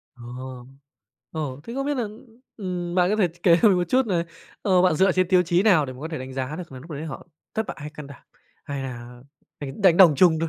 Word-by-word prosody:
Ồ. 125 +1 -9 0.7
Ồ! 145 -4 -4
Thế 235 - -7
không 275 0 -2
biết 290 - 0
nà, 245 - 0 0.5
ừm, 180 -4 -4
bạn 180 +1 +3
có 215 - +1
thể 190 -5 +3
ch 170 +2 -20
kể 170 -2 +6
cho 225 - +8
mình 195 - +4
một 175 - +1
chút 260 -1 +3
nà, 175 -4 0 0.4
ờ, 185 -3 +4
bạn 185 -3 +4
dựa 190 +3 +4
trên 185 0 +1
tiêu 180 -1 +5
chí 175 +1 +2
nào 185 -9 +4
để 130 - -6
mà 125 - -13
có 160 - -5
thể 160 - -5
đánh 130 +1 -7
giá 130 +3 -4
được 175 -5 -8
nà 130 - -8
lúc 160 +7 -13
đấy 150 0 -5
họ 155 0 -8 0.3
thất 220 -1 -1
bại - - -6
hay 150 - -6
can 150 -2 -10
đảm, 140 - -13 0.4
hay 140 -2 -4
là 120 -1 -8 0.4
đánh 140 +8 -7
đánh 180 -4 +6
đồng 175 -5 +8
chung 165 -2 +5
thôi? 165 - 0
165 Hz, 270 wpm, -24 LUFS, 135-185 Hz, 0.7 s, cho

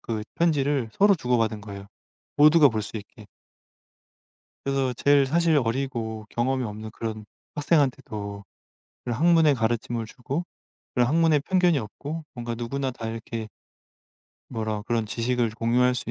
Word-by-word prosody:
그 110 -2 -4
편지를 145 -7 +1
서로 200 0 +6
주고받은 115 - 0
거예요. 100 -1 -9 0.5
모두가 150 0 +7
볼 110 -3 -2
수 105 +2 -7
있게. 105 +1 -11 1.4
그래서 135 -2 0
제일 140 +2 +4
사실 165 +1 +3
어리고 115 -3 -3
경험이 130 +2 0
없는 110 0 -6
그런 110 -2 -5 0.3
학생한테도 125 -10 0 0.6
그런 120 -2 -3
학문의 165 -2 +5
가르침을 115 0 -1
주고 135 +9 -4 0.5
그런 125 -2 +3
학문에 160 -1 +4
편견이 175 0 +2
없고 145 +8 -6
뭔가 120 -1 -4
누구나 130 +3 -3
다 115 -2 -6
이렇게 115 0 -5 1.0
뭐라 110 -3 -3
그런 115 0 -1
지식을 120 +1 0
공유할 120 +3 +2
수 115 -1 -4
120 Hz, 310 characters per minute, -25 LUFS, 110-145 Hz, 1.4 s, 모두가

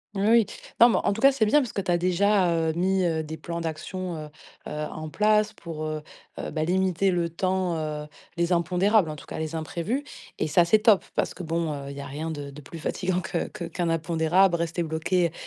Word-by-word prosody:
Oui 200 +1 +1
oui. 230 -1 +6 0.4
Non 235 - +10
mais - - +2
en - - +3
tout 220 - -5
cas 275 +1 +7
c'est 250 -5 +1
bien 255 +8 +5
parce 250 -5 -4
que - - -3
tu 190 - -4
as 175 - +4
déjà, 185 +1 +3
heu, 160 -1 +1
mis, 185 +1 +2
heu, 160 -2 0
des 160 +1 -6
plans 170 0 -5
d'action, 170 +2 -4
heu - - -11 0.4
heu, - - -7 0.2
en 155 0 -6
place 215 +3 +2
pour, 160 -2 -6
heu, 155 0 -3 0.5
bah, 155 0 -1
limiter 190 +1 +2
le 175 -2 0
temps, 185 0 0
heu, 150 -1 -4 0.3
les 170 0 0
impondérables, 180 +2 +3
en 155 - -5
tout 145 - -12
cas - - -6
les 160 0 -3
imprévus 175 - -2 0.3
et - - 0
ça, 170 +3 +5
c'est 215 +6 +4
top! 210 -2 +4
Parce - - 0
que 185 - -8
bon, 165 -1 -1
heu, 140 -1 -6
il - - -8
y 140 - -6
a - - -7
rien 150 +4 -4
de 145 -3 -5
de 140 +2 -11
plus 165 - -10
fatigant 185 +3 -1
que 185 - -2
que - - -8
qu'un 170 +1 -2
impondérable, 165 +3 +2
rester 170 +1 -1
bloqué 165 +2 0
170 Hz, 235 wpm, -26 LUFS, 160-190 Hz, 0.5 s, Non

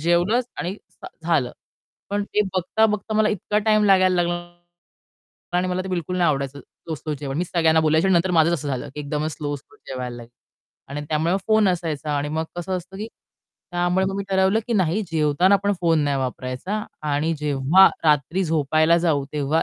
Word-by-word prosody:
जेवलंच 175 +9 +2 0.2
आणि 180 +2 -3 0.5
झालं. 155 -8 +1 0.6
पण 205 0 0
ते 210 - 0
बघता-बघता 210 +3 0
मला 215 0 +3
इतका 210 +1 -1
टाईम 215 0 +3
लागायला 185 -2 +4
लागला 175 0 -1 1.2
आणि 185 +1 +1
मला 180 +1 -1
ते 190 - -7
बिलकुल 180 0 -2
नाही 175 -3 +3
आवडायचं 140 0 -3
स्लो-स्लो 155 0 -7
जेवण. 135 -1 -4
मीच 175 - -2
सगळ्यांना 160 -1 +4
बोलायची 160 +3 +2
आणि 190 - +3
नंतर 175 +2 +2
माझच 170 -1 +4
असं 150 -3 -2
झालं 130 -2 -3
की 150 - -5
एकदमच 150 +2 -3
स्लो-स्लो 145 +7 -6
जेवायला 125 -2 -5
लागले. 120 -1 -11 0.6
आणि 145 +2 -5
त्यामुळे 160 +3 +1
मग - - +1
फोन 215 -2 +4
असायचा 160 -4 -2
आणि 145 +1 -2
मग 160 +2 -2
कसं 185 +2 -2
असतं 185 +2 -9
की 215 +2 -5 0.6
त्यामुळे 175 +2 +1
मग 195 - -2
मी 200 - -2
ठरवलं 190 +2 +3
की 240 - -2
नाही 195 0 +1
जेवताना 160 +5 +3
आपण 200 +1 +1
फोन 165 -2 +3
नाही 140 -1 0
वापरायचा 130 - -3 0.3
आणि 155 +3 +1
जेव्हा 150 +5 +5 0.2
रात्री 155 +5 +2
झोपायला 155 +1 +3
जाऊ, 160 -5 +1
तेव्हा 150 +2 +1
170 Hz, 180 wpm, -23 LUFS, 150-190 Hz, 1.2 s, जेव्हा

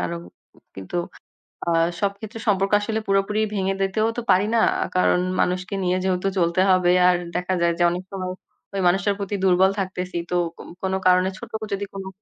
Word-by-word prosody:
কারণ 85 -1 -3 0.6
কিন্তু 95 - -4 0.7
আ - - +2 0.3
সব 200 -1 +2
ক্ষেত্রে 220 +1 -8
সম্পর্ক 195 -1 +2
আসলে 220 +1 -1
পুরোপুরি 195 +2 +1
ভেঙে 195 0 0
দিতেও 205 +3 +1
তো - - -1
পারি 190 +3 +3
না। 230 - +4 0.4
কারণ 180 - +3 0.2
মানুষকে 185 +2 -1
নিয়ে 180 0 +1
যেহেতু 185 0 0
চলতে 170 +1 +2
হবে, 180 -1 +4 0.2
আর 180 - +4 0.2
দেখা 180 +1 -1
যায় 170 0 +3
যে - - +4
অনেক 180 +1 -4
সময় 185 -2 -4 0.4
ওই 195 - 0
মানুষটার 200 +3 +2
প্রতি 200 0 -3
দুর্বল 190 0 +4
থাকতেছি। 185 -2 -3
তো - - +1 0.2
কো - - -10 0.2
কোনো 190 0 0
কারণে 185 +1 +4
ছোট - - -10 0.2
যদি, 200 +1 -2
কোনো 195 -1 -6
190 Hz, 180 wpm, -23 LUFS, 180-195 Hz, 0.7 s, না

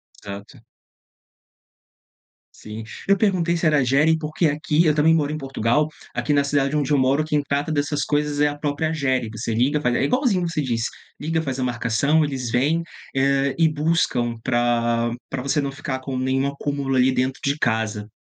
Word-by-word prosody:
Exato. 100 0 -10 2.0
Sim. 110 +1 -8 0.2
Eu 200 - +5
perguntei 180 -5 +1
se 165 0 -2
era 150 -1 +4
Agere, 140 +5 +3
porque 155 +2 0
aqui, 150 +2 +1
eu 150 -2 +3
também 155 +2 +4
moro 150 -2 +1
em 155 - -3
Portugal, 135 +1 0 0.3
aqui 150 - -1
na 145 -1 +3
cidade 140 0 0
onde 145 -1 0
eu 145 - +4
moro, 135 +3 +2
quem 150 -2 0
trata 145 +2 -1
dessas 145 0 0
coisas 150 0 -1
é 150 - +4
a 145 0 -3
própria 145 +2 -1
Agere. 130 -7 0
você 115 +1 -3
liga, 135 +6 +2
faz 125 -4 +1
é - - +1
igualzinho 240 -9 +1
você 165 -2 -2
diz, 120 -5 -1 0.4
liga, 160 +2 -1
faz 135 -4 -4
a - - 0
marcação, 125 +5 +1
eles 135 -5 -3
vêm, 145 +8 +2 0.3
hã, 135 0 +2
e 165 -1 +4
buscam 145 -7 0
pra 120 -1 +1 0.2
pra 135 - -3
você 140 +2 +1
não 140 -1 -3
ficar 135 -1 -4
com 130 0 -5
nenhum 130 +1 0
acúmulo 140 -1 -2
ali 130 +1 +4
dentro 130 +1 -1
de 140 +1 0
casa. 110 -2 -1
140 Hz, 185 wpm, -22 LUFS, 130-150 Hz, 2.0 s, Eu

